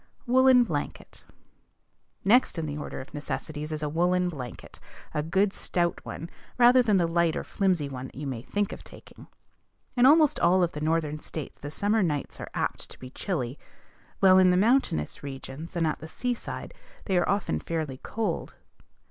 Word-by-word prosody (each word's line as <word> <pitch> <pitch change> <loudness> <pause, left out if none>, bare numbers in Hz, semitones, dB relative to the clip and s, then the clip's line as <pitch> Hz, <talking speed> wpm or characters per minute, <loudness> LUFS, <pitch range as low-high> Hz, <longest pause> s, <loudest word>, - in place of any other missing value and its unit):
WOOLLEN 255 0 +6
BLANKET. 155 -10 -5 1.0
Next 235 0 +4
in 165 - -2
the 145 -1 -4
order 150 - -5
of 130 - -13
necessities 150 +1 -4
is 155 0 -3
a - - 0
woollen 180 +4 +1
blanket, 130 -8 -8 0.3
a 150 - 0
good 190 +6 +1
stout 175 -1 -1
one, 165 - -6 0.3
rather 250 +1 +7
than 215 -5 +3
the 175 - +3
light 165 -1 +1
or - - -2
flimsy 185 -7 0
one 130 -1 -6
that - - -17
you 145 +3 -5
may 130 -4 -4
think 205 +9 -1
of - - -10
taking. - - -14 0.7
In 250 0 +6
almost 305 0 +5
all 185 +1 +4
of 170 - +1
the 150 - -6
Northern 155 -1 0
States 155 -1 -7
the 145 - -6
summer 205 +8 +1
nights 150 -6 -2
are - - -6
apt - - -2
to - - -12
be 130 0 -10
chilly; 135 - -3 0.6
while 190 -1 +7
in 185 -1 +6
the 180 - +4
mountainous 215 - +2
regions, 140 +3 -8
and 170 -1 +1
at 155 - -1
the 155 - -8
seaside, 245 +8 -4 0.3
they 190 - 0
are 175 - +2
often 200 +1 0
fairly 155 -6 -4
cold. 225 -1 -3
170 Hz, 180 wpm, -27 LUFS, 150-200 Hz, 1.0 s, rather